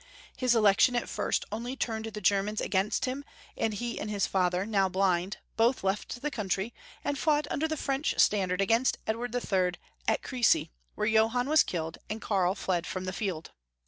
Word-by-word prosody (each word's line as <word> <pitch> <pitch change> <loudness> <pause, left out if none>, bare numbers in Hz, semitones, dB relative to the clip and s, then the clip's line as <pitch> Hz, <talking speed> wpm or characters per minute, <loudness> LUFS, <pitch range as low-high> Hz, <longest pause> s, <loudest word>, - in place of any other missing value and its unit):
His 250 -2 +2
election 215 +3 +5
at 240 - 0
first 210 - -1
only 235 +4 -4
turned 220 -4 -2
the 215 -1 -6
Germans 200 +2 +2
against 195 +1 0
him, 265 +2 -3 0.3
and 225 - 0
he 235 +3 -4
and 210 - -4
his 205 -2 +1
father, 180 0 +1
now 200 -3 +2
blind, 185 0 +1 0.2
both 235 +1 +3
left 205 +6 -2
the 295 - -1
country, 205 -2 -2 0.3
and 285 -1 -1
fought 300 -1 +2
imder 320 +2 0
the 315 - -2
French 275 +1 -1
standard 190 -2 +3
against 230 +6 +2
Edward 230 +2 -2
III. 185 -7 +1 0.3
at - - +1
Crecy, 245 - +2 0.2
where - - -1
Johann 225 +3 +3
was 310 0 +6
killed, 165 -2 -3
and 215 - -3
Karl 190 -3 +1
fled 180 -4 -1
from 185 0 -4
the 185 - -3
field. 180 -6 -3
215 Hz, 180 wpm, -29 LUFS, 190-245 Hz, 0.3 s, was